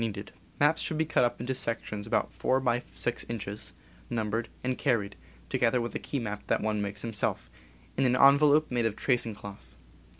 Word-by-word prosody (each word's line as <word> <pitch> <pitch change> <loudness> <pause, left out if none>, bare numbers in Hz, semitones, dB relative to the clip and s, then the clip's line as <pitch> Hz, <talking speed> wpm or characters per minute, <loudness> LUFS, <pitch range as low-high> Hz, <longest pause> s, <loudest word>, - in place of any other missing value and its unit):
* - - -28
Maps 150 +3 +4
should 160 - -2
be 160 - +2
cut 155 -5 +2
up 120 0 0
into 125 +3 -2
sections 115 -4 -3
about 110 - 0
4 130 - +1
by 125 -2 +1
6 120 - -2
inches, 105 -2 -4 0.4
numbered, 115 0 -1
and 130 0 0
carried 110 -8 0 0.3
(together 120 - +2
with 120 0 -3
a - - -2
key 145 - -3
map 105 -4 -3
that - - +2
one 105 -1 0
makes 100 0 -3
himself) 115 -3 -2 0.5
in 135 - +3
an 125 0 +4
envelope 145 +3 +6
made 120 -2 +2
of 105 - -3
tracing 120 -4 +1
cloth. 95 -12 -11
120 Hz, 190 wpm, -29 LUFS, 105-130 Hz, 0.5 s, envelope